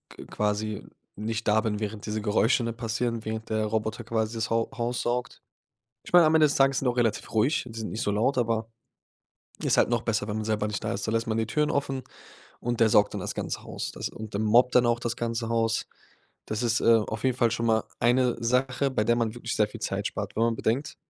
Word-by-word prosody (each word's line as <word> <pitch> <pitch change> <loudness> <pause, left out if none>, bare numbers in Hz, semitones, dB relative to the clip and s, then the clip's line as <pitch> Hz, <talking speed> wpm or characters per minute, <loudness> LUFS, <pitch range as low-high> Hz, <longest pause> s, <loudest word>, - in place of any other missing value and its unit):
q - - -10
quasi 105 0 -2 0.3
nicht 110 +2 -3
da 105 +1 +4
bin, 105 -2 -2
während 105 -1 -4
diese 105 0 -2
Geräusche, 110 +4 +2
ne, 115 - -1
passieren, 115 0 -2
während 110 0 -4
der 110 0 0
Roboter 110 +1 -2
quasi 110 0 -1
das 115 +2 -2
Hau 115 0 +1
Haus 120 +1 -1
saugt. 120 0 -2 0.6
Ich - - -12
meine, 175 -2 +8
am 155 +1 +4
Ende 155 - +6
des 145 - +1
Tages 135 -1 +3
sind 135 - -1
auch 125 0 0
relativ 110 -4 0
ruhig. 115 +8 +2
Die 115 -1 -9
sind 110 - -4
nicht 110 - -3
so 105 - 0
laut, 115 +7 +1
aber 115 -2 0 0.9
ist - - +2
halt - - +4
noch 120 -1 0
besser, 110 -3 -1
wenn 105 0 -3
man 110 - -2
selber 105 -1 0
nicht 105 -1 -4
da - - -2
ist. 100 - -3
Da 110 - -1
lässt 115 0 0
man 110 0 -1
die 110 - 0
Türen 150 +6 0
offen 135 -2 -1 0.6
und 120 -1 -2
der 115 -1 +5
saugt 105 0 +4
dann - - -4
das - - -3
ganze - - -4
Haus. - - -5
Das - - -4
und 110 -2 -8
dann 105 - 0
mobbt 120 +4 +4
dann 125 -1 +6
auch 120 0 +2
das 120 -1 -2
ganze 115 -1 -2
Haus. 115 0 +1 0.6
Das 110 +2 -3
ist, 120 -1 +1
äh, 115 - +5
auf 110 0 -5
jeden 130 -2 +2
Fall 120 -2 +3
schon 115 +1 -1
mal 110 -1 +2
eine 125 +1 +3
Sache, 130 +3 +1
bei 105 -5 0
der 120 +2 +3
man 115 -2 0
wirklich 120 -1 -4
sehr 105 -1 +3
viel - - -10
Zeit - - -2
spart, - - -4
wenn 110 - +1
man 115 - +1
bedenkt, 125 +8 -1
115 Hz, 245 wpm, -27 LUFS, 110-120 Hz, 0.9 s, meine